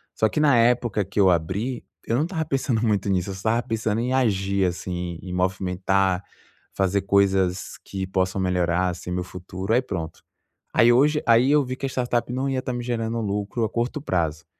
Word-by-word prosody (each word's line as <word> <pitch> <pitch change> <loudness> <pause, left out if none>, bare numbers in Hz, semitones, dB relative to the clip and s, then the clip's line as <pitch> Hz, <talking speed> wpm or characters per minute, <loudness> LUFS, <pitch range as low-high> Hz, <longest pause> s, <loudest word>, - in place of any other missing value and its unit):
Só 110 - +3
que - - -2
na 145 -5 +5
época 115 -3 +2
que 100 +2 -4
eu 95 -2 +6
abri, 95 +9 -1 0.2
eu 115 - +1
não 135 - +2
estava 160 -1 -2
pensando 135 -5 0
muito 105 -2 +1
nisso. 95 -1 0
Eu - - -3
só 95 - -8
estava 120 +1 +1
pensando 110 -1 -1
em 125 +2 -1
agir, 100 -6 +1
assim, 90 -1 -3
em 90 -1 -7
movimentar, 95 +1 0 0.5
fazer 95 +1 +1
coisas 95 -2 +1
que 95 -1 -4
possam 95 0 0
melhorar, 90 0 +1
assim, 90 0 -6
meu 90 0 -1
futuro, 95 +3 -5
aí 125 - +4
pronto. 85 -9 -6 0.5
Aí 120 +1 +6
hoje 150 +5 +3
aí 120 +4 +5
eu 150 -1 +4
vi 130 0 -4
que 135 - -5
a - - -1
startup 125 -2 -1
não 130 +2 -1
ia 135 -1 0
estar 130 -1 -4
me 120 0 -4
gerando 115 -1 -2
lucro 105 +2 -2
a - - -3
curto 120 +5 -2
prazo. 85 - -1
100 Hz, 200 wpm, -24 LUFS, 95-120 Hz, 0.5 s, eu